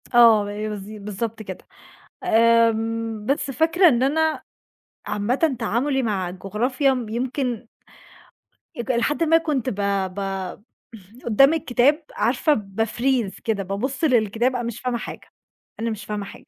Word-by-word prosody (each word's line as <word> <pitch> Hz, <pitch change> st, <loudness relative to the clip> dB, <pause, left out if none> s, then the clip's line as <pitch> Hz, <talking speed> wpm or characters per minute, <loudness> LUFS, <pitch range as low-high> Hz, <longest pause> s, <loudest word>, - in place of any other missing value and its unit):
آه 230 Hz, -3 st, +7 dB
ب -, -, -6 dB
بالض 210 Hz, -1 st, -5 dB
بالضبط 215 Hz, +1 st, -5 dB
كده. 190 Hz, -3 st, -9 dB, 0.6 s
آمم 225 Hz, -1 st, +2 dB
بس 275 Hz, +2 st, 0 dB
فاكرة 330 Hz, +7 st, +4 dB
إن 245 Hz, -2 st, +2 dB
أنا 315 Hz, +3 st, +1 dB, 0.6 s
عامةً 250 Hz, +8 st, 0 dB
تعاملي 265 Hz, +4 st, 0 dB
مع 200 Hz, -6 st, -1 dB
الجغرافيا 240 Hz, +9 st, 0 dB
م 245 Hz, -4 st, -4 dB
يمكن 245 Hz, 0 st, -3 dB, 1.1 s
اك 240 Hz, +2 st, -2 dB
إلى 235 Hz, -1 st, +1 dB
حد 295 Hz, +6 st, +1 dB
ما 325 Hz, 0 st, +5 dB
كنت 295 Hz, -6 st, -1 dB
ب 215 Hz, -, -4 dB, 0.4 s
ب -, -, -4 dB, 1.1 s
قدام 275 Hz, +6 st, +5 dB
الكتاب 290 Hz, 0 st, +2 dB
عارفة 260 Hz, +7 st, +2 dB
باfreeze 225 Hz, +2 st, -1 dB
كده. 215 Hz, -3 st, -1 dB
بابص 220 Hz, -, -3 dB
للكتاب، 240 Hz, -2 st, +2 dB
أنا 245 Hz, -, -2 dB
مش 235 Hz, -1 st, -5 dB
فاهمة 250 Hz, -1 st, -1 dB
حاجة، -, -, -8 dB, 0.5 s
أنا 230 Hz, +1 st, -1 dB
مش 215 Hz, -1 st, -5 dB
فاهمة 210 Hz, -1 st, -4 dB
حاجة -, -, -12 dB
235 Hz, 140 wpm, -23 LUFS, 215-265 Hz, 1.1 s, آه